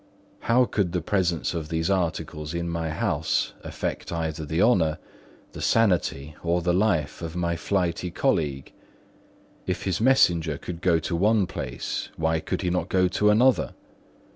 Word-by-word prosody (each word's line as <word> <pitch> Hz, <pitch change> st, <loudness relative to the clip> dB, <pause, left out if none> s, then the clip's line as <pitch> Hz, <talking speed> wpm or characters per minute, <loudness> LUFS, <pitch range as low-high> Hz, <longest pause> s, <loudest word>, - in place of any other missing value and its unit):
How 125 Hz, +2 st, +3 dB
could 95 Hz, -7 st, -1 dB
the 90 Hz, -, 0 dB
presence 90 Hz, -5 st, 0 dB
of 80 Hz, -3 st, -4 dB
these 80 Hz, 0 st, -1 dB
articles 80 Hz, -4 st, -2 dB
in 85 Hz, 0 st, -2 dB
my 85 Hz, -1 st, -2 dB
house 80 Hz, -, 0 dB
affect -, -, -4 dB
either 80 Hz, -2 st, -3 dB
the 80 Hz, +3 st, -1 dB
honour, 85 Hz, -8 st, +3 dB, 0.5 s
the -, -, -8 dB
sanity, 80 Hz, -9 st, +1 dB
or 85 Hz, 0 st, 0 dB
the 90 Hz, 0 st, +2 dB
life 90 Hz, -7 st, +1 dB
of 85 Hz, 0 st, -5 dB
my 85 Hz, -1 st, 0 dB
flighty 90 Hz, 0 st, -1 dB
colleague? 80 Hz, -, -1 dB, 0.9 s
If -, -, -2 dB
his 95 Hz, 0 st, -1 dB
messenger 85 Hz, -, +3 dB
could 85 Hz, +2 st, -7 dB
go 90 Hz, -2 st, +3 dB
to 80 Hz, +2 st, -2 dB
one 105 Hz, +3 st, +3 dB
place, -, -, -4 dB
why 80 Hz, 0 st, +1 dB
could 80 Hz, -, -3 dB
he 90 Hz, -, 0 dB
not 90 Hz, -, -1 dB
go 90 Hz, -1 st, +3 dB
to 105 Hz, +3 st, +2 dB
another? 120 Hz, +5 st, +3 dB
85 Hz, 160 wpm, -25 LUFS, 80-95 Hz, 0.9 s, How